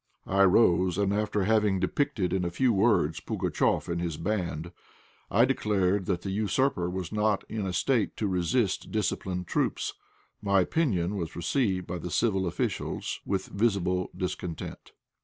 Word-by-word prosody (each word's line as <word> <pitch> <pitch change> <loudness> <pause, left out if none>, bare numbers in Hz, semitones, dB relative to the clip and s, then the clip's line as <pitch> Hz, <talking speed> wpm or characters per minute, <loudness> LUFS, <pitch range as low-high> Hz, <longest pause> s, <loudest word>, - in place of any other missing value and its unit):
I 100 +1 +4
rose, 90 -2 +4
and 100 -1 +1
after 105 -1 0
having 105 -2 +2
depicted 95 - 0
in 95 -1 +1
a 85 - 0
few 120 +8 +2
words 95 -7 +2
Pugatchéf - - 0
and 85 0 -2
his 85 -3 -3
band, 85 -3 -2 0.6
I 115 +4 +5
declared 100 -7 +1
that 90 -3 -1
the 95 - -3
usurper 105 -1 +1
was 90 -1 -4
not 105 -1 +1
in 105 -3 -3
a - - -2
state 115 +3 +1
to 110 - -1
resist 95 +3 0
disciplined 95 -4 -1
troops. - - -1 0.5
My 100 -2 +3
opinion 100 - 0
was 85 -3 -4
received 95 - 0
by 90 0 -4
the 90 - -5
civil 95 -1 +1
officials 85 - -2
with 95 -1 -1
visible 95 -4 0
discontent. 90 -2 -5
95 Hz, 155 wpm, -28 LUFS, 90-105 Hz, 0.6 s, I